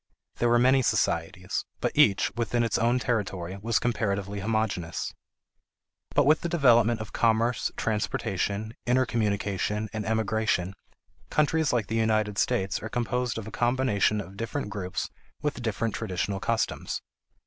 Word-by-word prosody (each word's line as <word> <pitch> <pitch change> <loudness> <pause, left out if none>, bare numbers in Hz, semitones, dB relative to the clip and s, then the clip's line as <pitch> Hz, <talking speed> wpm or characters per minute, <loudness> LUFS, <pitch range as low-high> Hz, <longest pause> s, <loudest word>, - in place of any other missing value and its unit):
There 120 - +2
were 120 - +5
many 130 +2 +5
societies, - - 0 0.2
but - - 0
each, 100 - +4
within 120 0 0
its 115 - 0
own 120 +2 +3
territory, 100 -7 -2
was 115 0 +1
comparatively 100 -3 -1
homogeneous. 100 -5 -1 1.0
But 145 - +5
with 150 +2 +4
the 170 - -2
development 120 -8 +4
of 110 - -8
commerce, 115 +1 +2
transportation, 105 0 -1
intercommunication, 105 -4 0
and 110 -1 -2
emigration, 110 -4 0 0.6
countries 155 +1 +2
like 120 -4 +1
the 110 +3 -2
United 110 -2 +1
States 95 0 0
are 110 - -5
composed 120 +1 -1
of 110 - -5
a 110 - -8
combination 120 -3 +2
of 95 -1 -11
different 115 +1 -3
groups 95 -3 -3 0.4
with 150 -4 -1
different 115 -1 -1
traditional 95 -2 -2
customs. 115 +3 -1
110 Hz, 135 wpm, -27 LUFS, 100-120 Hz, 1.0 s, were